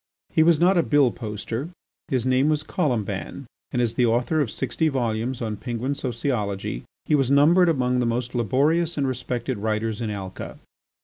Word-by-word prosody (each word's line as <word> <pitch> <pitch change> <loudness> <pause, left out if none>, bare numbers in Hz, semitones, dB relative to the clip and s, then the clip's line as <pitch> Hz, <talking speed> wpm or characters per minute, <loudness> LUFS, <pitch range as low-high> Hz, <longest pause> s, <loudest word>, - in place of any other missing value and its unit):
He - - +4
was 160 -1 +5
not 180 +1 +4
a - - +6
bill 145 -5 +3
poster; 115 +6 -5 0.4
his 130 -3 0
name 130 +3 +3
was 155 0 +1
Colomban, 120 -11 -2 0.3
and 125 - -1
as 120 -2 +1
the 125 - +2
author 120 +7 +1
of 135 - -1
sixty 135 +7 -1
volumes 120 -2 -1
on 110 -2 -3
Penguin 120 +4 -3
sociology 115 - -2 0.2
he - - 0
was 135 -4 +3
numbered 165 +6 +5
among 125 -5 +1
the 120 - +1
most 120 +1 -2
laborious 145 +8 +1
and 140 -2 +1
respected 125 -2 -3
writers 110 +1 -1
in 115 - -2
Alca. 95 -3 -6
125 Hz, 175 wpm, -24 LUFS, 115-145 Hz, 0.4 s, a